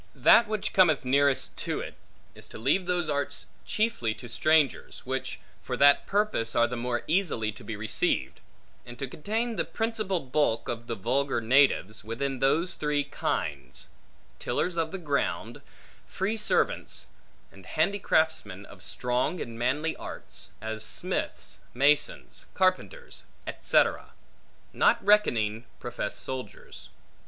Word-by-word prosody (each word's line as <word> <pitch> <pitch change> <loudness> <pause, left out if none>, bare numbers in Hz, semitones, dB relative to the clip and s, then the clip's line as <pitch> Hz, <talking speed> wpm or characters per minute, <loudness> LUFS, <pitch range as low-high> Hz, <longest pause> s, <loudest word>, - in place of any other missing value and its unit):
That 235 - +6
which 215 -1 -2
cometh 165 -8 +4
nearest 140 +1 +2
to - - -2
it, - - -6 0.4
is - - -10
to - - -10
leave 150 - +1
those 175 -2 +1
arts 145 -1 -2 0.2
chiefly 165 - 0
to 120 - -10
strangers 155 +3 +1
(which, - - -3 0.2
for - - -4
that 140 0 +5
purpose, 200 - +1
are 120 - +5
the 120 +1 -3
more 120 0 -2
easily 155 - 0
to 110 - -13
be 115 - -5
received), 105 +1 0 0.4
and 120 0 -11
to 135 - -3
contain 220 - -2
the - - +2
principal 220 -5 -1
bulk 135 -4 0
of 120 0 -4
the 115 - -2
vulgar 130 +6 0
natives, 115 -4 +3
within 130 +5 -3
those 160 +7 +2
three 150 -1 0
kinds, - - -3 0.5
tillers 180 -1 -1
of 165 -1 0
the 190 - -4
ground; 145 -6 -2 0.5
free 200 +4 -2
servants; 215 -1 0 0.5
and 95 -1 -15
handicraftsmen 160 - +1
of 95 - -14
strong 125 - -1
and 115 -1 -6
manly 145 +6 0
arts, - - -8
as 110 -1 -4
smiths, - - -3 0.2
masons, 140 +3 +1
carpenters, 190 - 0 0.2
etc.; - - +1 0.6
not - - +4
reckoning 120 - +3
professed 120 -4 -4
soldiers. 130 -1 -7
140 Hz, 135 wpm, -28 LUFS, 120-180 Hz, 0.6 s, That